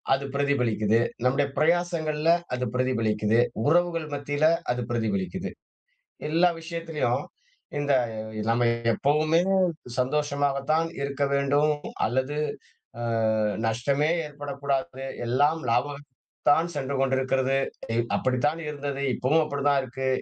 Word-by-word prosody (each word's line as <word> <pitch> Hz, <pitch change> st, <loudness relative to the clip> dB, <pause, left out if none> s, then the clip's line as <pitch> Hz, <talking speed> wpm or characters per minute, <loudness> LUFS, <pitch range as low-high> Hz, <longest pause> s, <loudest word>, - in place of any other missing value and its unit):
அது 140 Hz, +1 st, -5 dB
பிரதிபலிக்குது. 115 Hz, -6 st, +2 dB, 0.2 s
நம்முடைய 135 Hz, +3 st, +2 dB
பிரயாசங்கள்ல 165 Hz, -2 st, +1 dB, 0.2 s
அது 125 Hz, 0 st, -1 dB
பிரதிபலிக்குது. 115 Hz, -3 st, +1 dB, 0.3 s
உறவுகள் 170 Hz, 0 st, +2 dB
மத்தியில 145 Hz, +1 st, 0 dB, 0.3 s
அது 125 Hz, 0 st, -1 dB
பிரதிபலிக்குது. 110 Hz, -, -2 dB, 0.8 s
எல்லா 170 Hz, +3 st, +4 dB
விஷயத்துலயும். 165 Hz, -6 st, -2 dB, 0.5 s
இந்த 145 Hz, -1 st, +1 dB, 0.6 s
நம்ம 120 Hz, +1 st, +2 dB, 0.3 s
எப்பவுமே 155 Hz, +6 st, +2 dB, 0.6 s
சந்தோஷமாகத்தான் 145 Hz, +3 st, +1 dB
இருக்க 140 Hz, 0 st, -1 dB
வேண்டும். 145 Hz, +2 st, +3 dB, 0.3 s
அல்லது 130 Hz, +5 st, -1 dB, 0.6 s
அ -, -, -4 dB, 0.6 s
நஷ்டமே 140 Hz, +7 st, +1 dB, 0.2 s
ஏற்படக்கூடாது. 140 Hz, -2 st, -3 dB, 0.2 s
எல்லாம் 145 Hz, +7 st, +2 dB
லாபகத்து 140 Hz, +4 st, -1 dB, 0.4 s
தான் 160 Hz, +4 st, +4 dB
சென்று 140 Hz, -1 st, -2 dB
கொண்டிருக்கிறது. 135 Hz, 0 st, +1 dB, 0.4 s
இ -, -, +1 dB, 0.2 s
அப்படித்தான் 130 Hz, +5 st, +1 dB
இருந்தது. 145 Hz, -2 st, -4 dB
இப்பவும் 155 Hz, +6 st, +2 dB
அப்படிதான் 140 Hz, -1 st, +1 dB
இருக்கு. 130 Hz, +1 st, -4 dB
140 Hz, 100 wpm, -26 LUFS, 130-150 Hz, 0.8 s, எல்லா